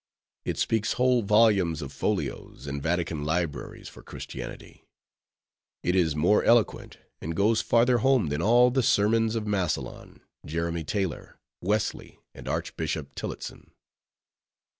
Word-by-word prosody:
It -, -, -2 dB
speaks 110 Hz, -2 st, +1 dB
whole 125 Hz, -1 st, +3 dB
volumes 100 Hz, -7 st, +3 dB
of 70 Hz, -1 st, -8 dB
folios, 70 Hz, -, -3 dB
and 70 Hz, 0 st, -4 dB
Vatican 80 Hz, -1 st, -1 dB
libraries, 80 Hz, -1 st, -3 dB
for -, -, -12 dB
Christianity; -, -, -9 dB, 1.0 s
it 90 Hz, -, +1 dB
is 80 Hz, -5 st, +2 dB
more 85 Hz, +8 st, +3 dB
eloquent, 115 Hz, -3 st, +2 dB, 0.2 s
and 80 Hz, +1 st, -4 dB
goes 110 Hz, +5 st, +3 dB
farther 120 Hz, +1 st, +3 dB
home 130 Hz, -, +3 dB
than 75 Hz, +3 st, -2 dB
all 120 Hz, +5 st, +5 dB
the 130 Hz, +1 st, +2 dB
sermons 115 Hz, 0 st, +2 dB
of 110 Hz, -2 st, -2 dB
Massillon, 95 Hz, -5 st, -3 dB, 0.2 s
Jeremy 85 Hz, +2 st, -2 dB
Taylor, 95 Hz, +1 st, -3 dB, 0.2 s
Wesley, 105 Hz, +3 st, -2 dB, 0.2 s
and -, -, -11 dB
Archbishop 75 Hz, -3 st, -3 dB
Tillotson. -, -, -7 dB
95 Hz, 125 wpm, -27 LUFS, 80-115 Hz, 1.0 s, all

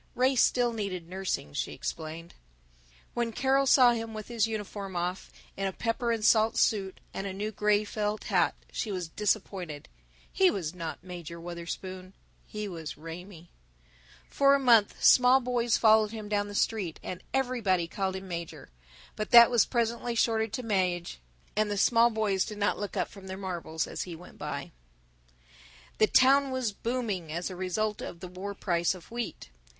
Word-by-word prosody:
Ray 260 Hz, +2 st, +3 dB
still 245 Hz, -1 st, +3 dB
needed 190 Hz, -6 st, -4 dB
nursing, 185 Hz, -, -3 dB
she -, -, -3 dB
explained. 165 Hz, +1 st, -6 dB, 0.8 s
When 235 Hz, -1 st, -1 dB
Carol 270 Hz, +3 st, +2 dB
saw 255 Hz, -2 st, +7 dB
him 225 Hz, -1 st, -4 dB
with 215 Hz, +1 st, -7 dB
his 230 Hz, -2 st, +1 dB
uniform 205 Hz, -3 st, -5 dB
off, 180 Hz, +2 st, -3 dB, 0.3 s
in 195 Hz, 0 st, -1 dB
a -, -, -2 dB
pepper 235 Hz, +4 st, -1 dB
and 225 Hz, -2 st, -1 dB
salt 220 Hz, 0 st, +4 dB
suit 195 Hz, -3 st, +1 dB
and 195 Hz, -, -4 dB
a 190 Hz, -, -4 dB
new 210 Hz, +3 st, -3 dB
gray 210 Hz, 0 st, +2 dB
felt 210 Hz, 0 st, -3 dB
hat, 175 Hz, -6 st, +2 dB, 0.2 s
she 215 Hz, -, -3 dB
was 180 Hz, -3 st, -3 dB
disappointed. 185 Hz, -5 st, -2 dB, 0.5 s
He 380 Hz, -1 st, +5 dB
was 175 Hz, -, -3 dB
not 165 Hz, -2 st, -6 dB
Major 175 Hz, -2 st, -8 dB
Wutherspoon; 185 Hz, +2 st, -7 dB, 0.3 s
he 210 Hz, 0 st, -5 dB
was 165 Hz, -5 st, -7 dB
Raymie. 170 Hz, +2 st, -10 dB, 0.8 s
For 275 Hz, 0 st, +4 dB
a -, -, +1 dB
month 230 Hz, -6 st, +4 dB
small 250 Hz, +1 st, +7 dB
boys 240 Hz, -2 st, +1 dB
followed 220 Hz, -1 st, +5 dB
him 215 Hz, -1 st, -7 dB
down 205 Hz, -1 st, 0 dB
the 205 Hz, -, -8 dB
street, 200 Hz, -7 st, -1 dB
and 180 Hz, -, -6 dB
everybody 230 Hz, -10 st, +1 dB
called 190 Hz, +1 st, -2 dB
him 190 Hz, 0 st, -7 dB
Major, 170 Hz, -, -7 dB, 0.4 s
but 215 Hz, -, -3 dB
that 235 Hz, 0 st, +9 dB
was 240 Hz, -2 st, +4 dB
presently 235 Hz, 0 st, -1 dB
shortened 225 Hz, -1 st, +1 dB
to 250 Hz, -, -3 dB
Maje, 180 Hz, -, -1 dB, 0.4 s
and 215 Hz, 0 st, +1 dB
the 205 Hz, -, -2 dB
small 230 Hz, +3 st, +5 dB
boys 215 Hz, -4 st, +1 dB
did 210 Hz, -, -7 dB
not 205 Hz, 0 st, 0 dB
look 205 Hz, -1 st, -4 dB
up -, -, 0 dB
from 195 Hz, -2 st, -12 dB
their 190 Hz, 0 st, -5 dB
marbles 175 Hz, -4 st, -3 dB
as -, -, -5 dB
he 175 Hz, -2 st, -5 dB
went 175 Hz, +2 st, -14 dB
by. -, -, -5 dB
III -, -, -35 dB, 0.6 s
The 215 Hz, -, +6 dB
town 275 Hz, +3 st, +5 dB
was 260 Hz, -4 st, -1 dB
booming, 210 Hz, -7 st, -3 dB
as 175 Hz, +4 st, -3 dB
a -, -, -7 dB
result 205 Hz, +4 st, -2 dB
of 170 Hz, -, -7 dB
the 180 Hz, -, -7 dB
war 190 Hz, +3 st, -6 dB
price 175 Hz, -2 st, 0 dB
of 180 Hz, +2 st, -14 dB
wheat. 235 Hz, -, -5 dB
205 Hz, 175 wpm, -29 LUFS, 180-230 Hz, 0.8 s, that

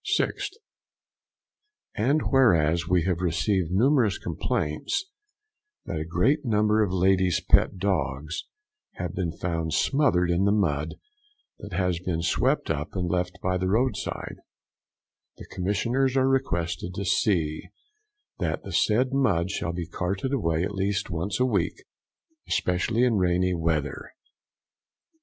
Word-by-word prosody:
6th. -, -, -2 dB, 1.4 s
And 140 Hz, +9 st, +1 dB
whereas 85 Hz, -, +3 dB
we 90 Hz, -1 st, +2 dB
have 90 Hz, -1 st, 0 dB
received 90 Hz, +1 st, 0 dB
numerous 115 Hz, -, +3 dB
complaints 75 Hz, -, -2 dB, 0.8 s
that 80 Hz, -, -3 dB
a 80 Hz, -, -3 dB
great 110 Hz, -, +2 dB
number 105 Hz, -2 st, +2 dB
of 100 Hz, -, -1 dB
ladies' 95 Hz, -1 st, +2 dB
pet -, -, +3 dB
dogs 80 Hz, -5 st, -2 dB, 0.5 s
having 90 Hz, -1 st, -5 dB
been 90 Hz, -3 st, -2 dB
found 80 Hz, -3 st, -2 dB
smothered 110 Hz, -, +2 dB
in 90 Hz, +3 st, +2 dB
the 100 Hz, -, +3 dB
mud 80 Hz, -7 st, 0 dB, 0.6 s
that 105 Hz, -2 st, -9 dB
has 90 Hz, -1 st, 0 dB
been 85 Hz, -2 st, -2 dB
swept 85 Hz, -, +1 dB
up -, -, -4 dB
and 90 Hz, -2 st, -1 dB
left 90 Hz, 0 st, 0 dB
by 90 Hz, 0 st, +1 dB
the 95 Hz, -, -1 dB
roadside, 125 Hz, +6 st, -1 dB, 1.0 s
the -, -, -10 dB
commissioners 115 Hz, +8 st, 0 dB
are 130 Hz, 0 st, +3 dB
requested 90 Hz, -, -1 dB
to 100 Hz, -, -3 dB
see 85 Hz, -6 st, 0 dB, 0.7 s
that 80 Hz, -4 st, -2 dB
the 95 Hz, -, -7 dB
said 110 Hz, +10 st, +2 dB
mud 95 Hz, -10 st, +1 dB
shall 85 Hz, -, -2 dB
be 85 Hz, 0 st, -4 dB
carted 95 Hz, -, -3 dB
away 85 Hz, -10 st, 0 dB
at 100 Hz, -, -3 dB
least 100 Hz, 0 st, -1 dB
once 90 Hz, +5 st, -2 dB
a 130 Hz, -, +4 dB
week, 100 Hz, -9 st, -1 dB, 0.6 s
especially 105 Hz, +6 st, +1 dB
in 120 Hz, -4 st, +3 dB
rainy 90 Hz, 0 st, +2 dB
weather. 80 Hz, -4 st, -2 dB
90 Hz, 135 wpm, -26 LUFS, 85-105 Hz, 1.4 s, a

